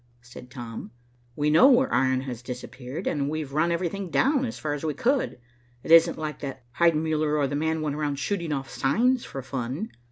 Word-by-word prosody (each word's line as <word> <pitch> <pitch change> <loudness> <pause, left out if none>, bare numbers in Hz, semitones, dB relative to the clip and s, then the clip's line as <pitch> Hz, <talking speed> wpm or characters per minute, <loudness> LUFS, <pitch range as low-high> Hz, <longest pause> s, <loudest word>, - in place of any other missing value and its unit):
said 120 +1 -12
Tom. 120 -3 -7 0.5
"We 150 0 +1
know 165 +11 +7
where 260 0 +4
iron 130 -1 +2
has 125 -3 -6
disappeared, 125 +2 -7
and 140 -2 0
we've 155 -3 -4
run 160 +3 +2
everything 180 +2 -2
down 270 - +2
as 235 - -5
far 150 -1 -2
as 145 - -5
we 155 -3 -1
could. 260 - 0 0.5
It - - -4
isn't 165 0 +7
likely 150 -2 -4
that 130 -1 -10 0.2
Heidenmuller 155 -2 +2
or 145 - +2
the 140 - -2
man 160 +1 0
went 145 -2 -2
around 150 -1 -1
shooting 170 +1 -2
off 135 -2 -2
signs 240 - +1
for 135 - -7
fun." 130 - -4
150 Hz, 195 wpm, -26 LUFS, 135-170 Hz, 0.5 s, know